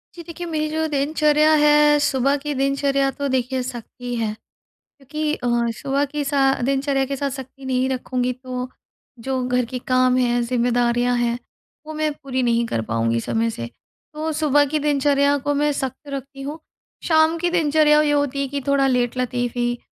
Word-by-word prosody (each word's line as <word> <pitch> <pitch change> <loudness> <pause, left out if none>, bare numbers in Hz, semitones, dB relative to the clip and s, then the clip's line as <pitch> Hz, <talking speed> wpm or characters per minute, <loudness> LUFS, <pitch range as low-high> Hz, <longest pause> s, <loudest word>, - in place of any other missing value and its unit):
जी, 340 - -9
देखिए 340 +1 -7
मेरी 310 -2 -2
जो 315 +1 -1
दिनचर्या 300 +1 +2
है 295 0 +5
सुबह 275 0 +2
की 295 +1 -4
दिनचर्या 275 0 +1
तो 285 +1 -3
देखिए 260 0 -1
सख्त 245 -3 -7
ही 245 0 -3
है। 225 -2 -1 0.5
क्योंकि 300 +2 -5
अ, 245 - -4 0.3
सुबह 280 +1 0
की 295 +1 -4
सा 275 -1 +3
दिनचर्या 270 +1 +1
के 275 +1 -3
साथ 280 +1 -2
सख्ती 265 0 -9
नहीं 260 0 0
रखूँगी 255 -1 -1
तो 255 0 -6 0.5
जो 260 +2 -2
घर 250 0 +1
के 250 +2 -5
काम 255 0 +3
हैं, 245 -1 +2
ज़िम्मेदारियाँ 245 0 +1
हैं, 240 0 0 0.5
वो 310 - -7
मैं 310 0 0
पूरी 260 -1 -1
नहीं 235 -1 +2
कर 115 - -2
पाऊँगी 115 +1 0
समय 225 - -1
से। 115 - -5 0.5
तो 310 +1 -3
सुबह 290 -1 +3
की 305 +2 -1
दिनचर्या 285 -1 +2
को 290 +1 -1
मैं 295 +1 +1
सख्त 265 +1 -5
रखती 275 0 -7
हूँ। 290 +4 -6 0.4
शाम 320 0 +3
की 350 +1 0
दिनचर्या 305 -3 +4
ये 300 -1 +1
होती 285 -1 0
है 275 - -1
कि 280 +1 -4
थोड़ा 280 -1 +3
लेट 250 -1 0
लतीफ़ 245 -1 -2
ही 240 0 0
275 Hz, 185 wpm, -21 LUFS, 250-295 Hz, 0.5 s, है